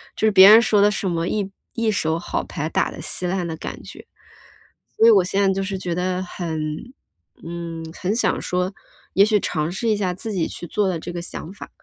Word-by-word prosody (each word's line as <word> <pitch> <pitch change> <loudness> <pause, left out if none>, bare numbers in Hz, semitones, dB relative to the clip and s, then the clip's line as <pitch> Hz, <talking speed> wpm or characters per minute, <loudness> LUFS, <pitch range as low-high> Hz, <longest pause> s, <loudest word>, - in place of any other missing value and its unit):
就 - - 0
是 - - +4
别 195 0 +9
人 220 +2 +10
说 210 -3 +3
的 205 - +6
什 210 -2 -2
么 170 0 -1
一 200 -1 -2 0.2
一 230 -2 0
手 160 -5 0
好 - - -3
牌 155 - -4
打 - - +1
得 - - -10
稀 180 - -2
烂 180 -1 -1
的 160 - -4
感 - - -7
觉。 - - -12 0.9
所 225 - +5
以 230 - +9
我 195 -4 +5
现 195 +2 0
在 190 - +3
就 195 - -2
是 195 0 -3
觉 175 -2 -3
得 185 +1 -1
很 170 -3 -5 0.8
嗯， 165 -1 -6
很 195 +4 -2
想 245 - +1
说， 180 +2 -1 0.4
也 195 - +6
许 215 -1 +3
尝 155 -1 -2
试 225 +5 -2
一 215 - +3
下 185 -3 -1
自 220 +3 -6
己 175 -4 0
去 175 - -7
做 205 +2 0
的 170 -3 -2
这 175 - -7
个 175 - -4
想 175 +1 -7
法， - - -10
185 Hz, 250 characters per minute, -22 LUFS, 170-205 Hz, 0.9 s, 人